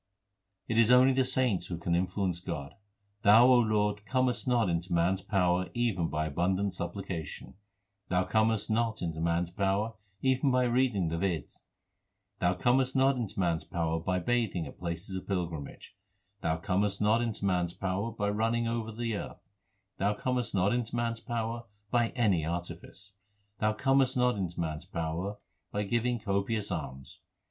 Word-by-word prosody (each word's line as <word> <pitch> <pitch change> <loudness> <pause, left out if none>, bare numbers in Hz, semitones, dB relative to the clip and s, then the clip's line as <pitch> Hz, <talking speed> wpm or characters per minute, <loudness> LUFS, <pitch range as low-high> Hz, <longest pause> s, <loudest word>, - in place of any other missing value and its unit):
It 115 0 +1
is 115 -1 +5
only 130 +1 +7
the 130 0 +3
saints 125 -8 0
who 85 - -4
can 85 0 -2
influence 90 0 0
God: 80 -6 -5 0.5
Thou, 110 +4 +7
Lord, 105 -3 +2
comest 130 -3 0
not 120 -4 +3
into 85 0 -2
man 85 +2 +3
s 95 - -5
power 90 -2 +1
even 110 -8 +1
by 75 0 -1
abundant 95 +5 0
supplication; 90 -3 -5 0.6
Thou 90 0 +2
comest 110 +2 +1
not 110 -1 0
into 80 -2 -3
man 85 +1 +1
s 85 - -8
power 100 +3 0 0.3
even 130 +1 +3
by 125 -1 +3
reading 120 -7 +2
the 85 - -2
Veds; 85 -4 -2 0.8
Thou 90 0 +2
comest 130 +3 +2
not 135 +1 +4
into 115 -6 -4
man 85 -3 +2
s - - -11
power 80 -2 -1
by 90 +3 -1
bathing 100 -4 0
at - - -11
places 85 +2 -4
of 95 - -6
pilgrimage; 85 -3 -4 0.5
Thou 80 - 0
comest 100 +3 0
not 110 +3 +3
into 115 -4 -2
man 90 -2 +2
s 85 - -7
power 95 +3 -2
by 105 -2 -2
running 115 +3 0
over 115 -1 -2
the 115 0 -2
earth: - - -7 0.5
Thou 100 +1 +1
comest 125 -2 -1
not 95 +3 +3
into 120 -1 -2
man 120 -1 0
s 115 - -7
power 115 0 -3 0.3
by 120 -2 +3
any 100 -10 +2
artifice; 85 +4 -6 0.5
Thou 110 0 +2
comest 135 +2 +2
not 125 -1 +3
into 90 -4 -4
man 80 -2 -1
s 85 - -12
power 85 +3 -3 0.3
by 105 - -1
giving 120 +3 0
copious 105 +1 -1
alms. 65 0 -6
100 Hz, 170 wpm, -30 LUFS, 90-115 Hz, 0.8 s, only